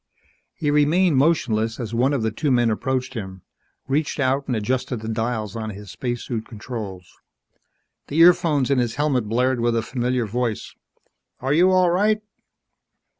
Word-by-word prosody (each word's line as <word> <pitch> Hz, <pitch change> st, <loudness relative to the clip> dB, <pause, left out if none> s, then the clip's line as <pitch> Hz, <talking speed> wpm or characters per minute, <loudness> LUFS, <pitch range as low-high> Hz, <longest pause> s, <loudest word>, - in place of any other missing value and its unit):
He 150 Hz, -5 st, -1 dB
remained 150 Hz, +2 st, +3 dB
motionless 115 Hz, -7 st, +1 dB
as 115 Hz, -2 st, -5 dB
one 125 Hz, +4 st, +2 dB
of 135 Hz, -6 st, 0 dB
the 110 Hz, -, 0 dB
two 145 Hz, +7 st, -2 dB
men 120 Hz, -3 st, +3 dB
approached 130 Hz, +3 st, -2 dB
him, 95 Hz, -6 st, -7 dB, 0.4 s
reached 145 Hz, +3 st, -1 dB
out 135 Hz, +1 st, +1 dB
and 125 Hz, -, 0 dB
adjusted 125 Hz, +2 st, -2 dB
the 110 Hz, -, -6 dB
dials 110 Hz, -2 st, -2 dB
on 110 Hz, -1 st, -4 dB
his 105 Hz, -1 st, -9 dB
spacesuit 120 Hz, -2 st, -4 dB
controls. 105 Hz, -5 st, -8 dB, 0.9 s
The 150 Hz, -, -4 dB
earphones 165 Hz, -5 st, +5 dB
in 135 Hz, -, +3 dB
his 120 Hz, -2 st, -1 dB
helmet 140 Hz, -5 st, +1 dB
blared 125 Hz, +2 st, +1 dB
with 120 Hz, 0 st, +1 dB
a 115 Hz, -, 0 dB
familiar 125 Hz, 0 st, -1 dB
voice, 115 Hz, 0 st, -3 dB, 0.7 s
"Are 135 Hz, +2 st, 0 dB
you 175 Hz, +4 st, +5 dB
all 185 Hz, -2 st, +4 dB
right?" 210 Hz, +4 st, +2 dB
125 Hz, 160 wpm, -22 LUFS, 110-145 Hz, 0.9 s, earphones